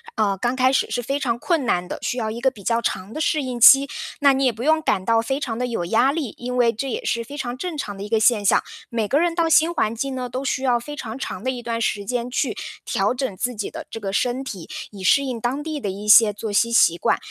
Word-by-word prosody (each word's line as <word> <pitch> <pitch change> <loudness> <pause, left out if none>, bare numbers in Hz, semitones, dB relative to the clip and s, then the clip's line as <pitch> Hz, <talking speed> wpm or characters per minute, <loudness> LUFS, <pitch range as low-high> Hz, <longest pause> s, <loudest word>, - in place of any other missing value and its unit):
呃， 205 -3 +1
刚 240 +6 -1
开 255 0 +3
始 270 - +1
是 245 +2 -2
非 275 +4 -2
常 240 -4 -1
困 305 +1 0
难 180 -4 0
的， - - -6
需 245 - -2
要 220 -3 -2
一 235 - -6
个 265 - +3
比 215 -6 -15
较 230 +3 +1
长 190 -1 -3
的 - - -5
适 310 0 +1
应 250 -2 -4
期， 270 +4 +8 0.3
那 280 -1 +6
你 270 0 +1
也 255 - +4
不 225 +3 -7
用 315 +1 +3
感 200 -10 0
到 230 -1 +3
非 265 +4 -2
常 240 -5 -4
地 250 - -1
有 230 -7 -3
压 240 +9 +3
力。 290 -10 -3
因 250 +1 -5
为 240 -2 +4
这 250 +5 -4
也 - - -4
是 235 - -1
非 285 +5 -9
常 245 -3 -4
正 340 +1 -5
常 205 -7 -5
的 195 - -6
一 210 - -7
个 225 0 +2
现 215 -2 +4
象， - - +4 0.3
每 230 -2 -1
个 280 - +2
人 340 0 +1
到 335 -1 +1
新 320 +1 +4
环 220 -9 0
境 265 +3 -3
呢， 250 -1 -4
都 255 +3 -4
需 265 -1 -1
要 245 -2 +2
非 295 +5 -8
常 240 -2 -7
长 190 -6 -5
的 260 - 0
一 245 -2 -6
段 230 -1 -3
时 205 -2 -1
间 245 +2 -3
去 - - -1 0.3
调 205 -2 0
整 255 -6 -3
自 250 +6 -2
己 210 -3 -4
的 320 0 -8
这 225 - -6
个 195 -2 -4
身 250 +5 0
体， 190 -10 -8 0.2
以 200 -2 -10
适 280 +9 +4
应 255 -4 -4
当 255 +5 -1
地 310 -1 -4
的 205 - -2
一 205 +2 -8
些 210 0 +8
作 210 +1 -6
息 210 +3 +2
习 170 -7 +4
惯。 - - +1
240 Hz, 310 characters per minute, -22 LUFS, 220-270 Hz, 0.3 s, 期